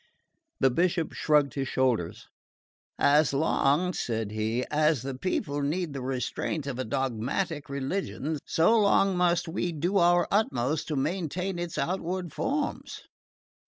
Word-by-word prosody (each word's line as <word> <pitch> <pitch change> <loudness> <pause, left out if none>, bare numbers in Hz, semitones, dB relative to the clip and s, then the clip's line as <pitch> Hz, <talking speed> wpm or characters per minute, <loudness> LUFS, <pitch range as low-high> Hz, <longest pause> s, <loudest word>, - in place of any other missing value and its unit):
The 135 - +4
Bishop 170 +3 0
shrugged 150 -2 +2
his 135 -2 -2
shoulders. 125 -11 0 0.7
"As 145 +1 +4
long," 155 +4 +2
said 110 -7 -2
he, 110 +3 -1
"as 150 -3 +2
the 135 0 -4
people 145 0 -2
need 155 +2 -1
the 135 - -5
restraint 135 +3 -3
of 135 -3 -4
a - - 0
dogmatic 135 - -2
religion 145 +2 -3
so 220 +8 +3
long 195 -2 +3
must 175 -1 +2
we 175 +1 -2
do 170 +5 0
our 175 0 +4
utmost 155 - 0
to 155 - -2
maintain 175 +5 -2
its 175 -1 -4
outward 180 +2 -2
forms. 285 +1 -3
150 Hz, 135 wpm, -28 LUFS, 135-175 Hz, 0.7 s, The